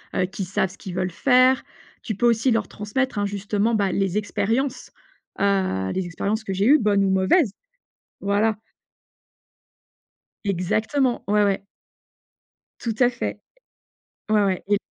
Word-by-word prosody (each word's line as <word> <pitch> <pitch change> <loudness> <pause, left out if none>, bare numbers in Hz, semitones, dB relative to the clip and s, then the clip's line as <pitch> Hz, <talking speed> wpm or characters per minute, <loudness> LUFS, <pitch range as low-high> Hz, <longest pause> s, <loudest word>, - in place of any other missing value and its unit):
heu, 185 - +2
qui 190 +1 -5
savent 185 0 -1
ce 195 - -15
qu'ils 185 -4 -8
veulent 185 0 -1
faire. 255 +6 +4 0.4
Tu 215 - -4
peux 240 - 0
aussi 235 +2 +2
leur 225 -3 +1
transmettre, 210 +2 -2
hein, 205 - 0
justement, 205 +3 -1
bah, 200 -3 +1
les 195 +1 0
expériences, 230 +5 -1 0.5
heu, 190 - +1
les 190 -1 -2
expériences 210 +6 -2
que 195 - -5
j'ai 195 +2 0
eues, 295 +4 +6
bonnes 205 -2 +2
ou 190 - +1
mauvaises. 190 - +3 0.7
Voilà. 205 +2 +1 1.9
Exactement, 215 +8 0
ouais, 210 0 +3
ouais. 195 -1 0 1.2
Tout 225 -2 -3
à 245 -1 +5
fait. 240 - -4 0.9
Ouais, 210 -1 +4
ouais, 190 -2 0
et 205 0 +3
205 Hz, 145 wpm, -23 LUFS, 195-230 Hz, 1.9 s, eues